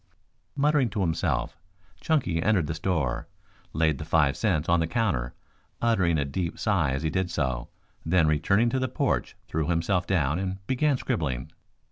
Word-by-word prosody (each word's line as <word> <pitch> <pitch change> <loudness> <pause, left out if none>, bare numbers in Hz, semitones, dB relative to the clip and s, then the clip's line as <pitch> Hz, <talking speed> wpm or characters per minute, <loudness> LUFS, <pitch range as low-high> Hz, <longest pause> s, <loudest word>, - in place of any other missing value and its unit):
Muttering 145 -3 +2
to 105 -1 -3
himself, 80 -8 0 0.4
Chunky 125 - 0
entered 100 -5 +2
the 80 - -3
store, 80 -7 -1 0.4
laid 80 -3 +1
the - - -4
five 75 -3 +2
cents 85 -8 0
on 85 0 +3
the 80 - 0
counter, 80 - -1 0.4
uttering 95 -8 +2
a 70 - 0
deep 85 +4 -3
sigh 95 -9 +1
as 70 +3 -2
he 80 - 0
did 95 -1 -1
so, 65 -7 -2 0.3
then 85 0 +3
returning 100 +10 +2
to 130 - 0
the 130 - 0
porch - - -1
threw 80 -2 -1
himself 85 +1 0
down 80 -4 +1
and 95 0 -4
began 135 +3 +1
scribbling. 75 - -2
85 Hz, 165 wpm, -27 LUFS, 75-100 Hz, 0.4 s, on